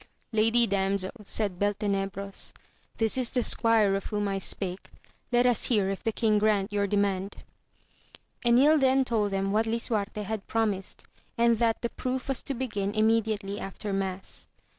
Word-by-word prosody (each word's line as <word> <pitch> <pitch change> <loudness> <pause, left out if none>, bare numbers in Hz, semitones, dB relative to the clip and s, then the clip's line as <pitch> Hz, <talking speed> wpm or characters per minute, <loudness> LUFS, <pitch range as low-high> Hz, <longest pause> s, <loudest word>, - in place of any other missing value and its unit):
Lady 225 +2 +4
Damsel, 195 -1 -1
said 200 -3 -2
Bel 205 0 +1
tenebros, 195 -1 -3 0.4
this 225 +3 +2
is 245 -2 +2
the 250 -2 +1
squire 225 -4 +3
of 195 0 -2
whom 205 -1 -2
I 195 -1 -2
spake, 190 0 0 0.4
let 245 0 +3
us 245 -4 +3
hear 205 -5 +1
if 195 - -5
the 225 - -1
king 215 -1 +1
grant 205 -1 +1
your 200 -1 +1
demand. 200 -1 -1 1.1
Enil 265 +6 +5
then 265 0 +3
told 215 -4 0
them 195 0 -1
what 220 +2 +1
Lisuarte 215 -2 -2
had 210 0 -5
promised, 210 -4 -2 0.3
and 235 -1 +3
that 230 0 +1
the 235 - 0
proof 255 +2 -4
was 270 - -1
to 275 - -4
begin 210 -5 -3
immediately 215 -2 +1
after 195 +1 -5
mass. 195 -1 -4
210 Hz, 160 wpm, -27 LUFS, 195-230 Hz, 1.1 s, Enil